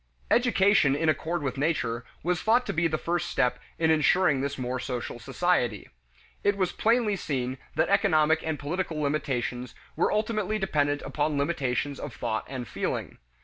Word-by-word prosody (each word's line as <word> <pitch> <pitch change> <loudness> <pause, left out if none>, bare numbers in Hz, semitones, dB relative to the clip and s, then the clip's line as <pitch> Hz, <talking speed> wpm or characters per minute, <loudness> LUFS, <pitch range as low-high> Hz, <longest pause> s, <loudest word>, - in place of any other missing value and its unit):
Education 200 - +4
in 160 +2 +1
accord 160 +1 -1
with 135 -1 -3
nature 125 -6 0 0.2
was 175 0 0
thought 235 +3 +3
to - - -2
be 165 +1 +2
the 155 -1 -1
first 175 +2 -2
step 125 -7 +1 0.2
in 160 -1 +3
insuring 155 -1 +3
this 140 +1 -2
more 130 0 -2
social 125 -2 -4
society. 130 - 0 0.5
It 205 0 +2
was 185 -3 +1
plainly 225 -2 +2
seen 130 -7 -3 0.2
that - - +2
economic 160 -5 +3
and 160 -2 -2
political 160 +2 -3
limitations 135 -4 -2 0.2
were - - +2
ultimately 215 -1 0
dependent 145 -7 0
upon 150 0 -1
limitations 140 -2 -1
of 120 - -6
thought 110 - -2
and 130 -3 -5
feeling. - - -3
155 Hz, 160 wpm, -27 LUFS, 135-180 Hz, 0.5 s, Education